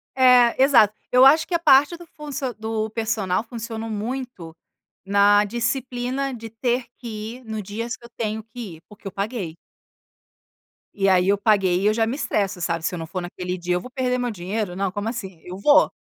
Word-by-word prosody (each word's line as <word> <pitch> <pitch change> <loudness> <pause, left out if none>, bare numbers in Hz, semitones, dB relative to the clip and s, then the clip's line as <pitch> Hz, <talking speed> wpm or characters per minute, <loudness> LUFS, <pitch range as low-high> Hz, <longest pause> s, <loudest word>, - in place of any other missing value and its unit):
É, 250 -2 +6
exato 240 -7 +6 0.2
eu 250 +1 +7
acho 305 +4 +6
que 360 - -6
a - - +2
parte 290 +1 +5
do 345 - -12
funcion 280 -4 -4
do 220 0 -2
personal 220 -4 -1
funcionou 225 -1 -6
muito 215 -6 -5 0.5
na 205 +1 +5
disciplina 250 +3 -2
de 225 -1 -8
ter 240 +2 -1
que 225 0 -6
ir 255 - -18
no 220 -1 -4
dias 225 +4 -4
que 235 - -16
eu - - -13
tenho 220 -1 -3
que 225 -7 -9
ir, - - -22
porque 210 -1 -11
eu 195 - -5
paguei. 200 -4 -4 1.4
E 195 -1 +2
aí 185 0 +4
eu 200 - +4
paguei 195 -4 +2
e - - -1
eu 215 - +4
já 225 0 +2
me 240 +4 -2
estresso, 195 -10 -1
sabe, 165 -1 -2
se - - -1
eu 175 - -4
não 160 - -6
for 185 - -4
naquele 180 +1 -5
dia 180 0 -2
eu 180 - -1
vou 250 - -10
perder 250 -1 -1
meu 245 0 -1
dinheiro, 195 -1 -4
não 195 0 -1
como 205 +3 -3
assim, 190 -8 -7
eu 180 +1 -8
vou. 290 +9 +5
220 Hz, 205 wpm, -23 LUFS, 195-245 Hz, 1.4 s, eu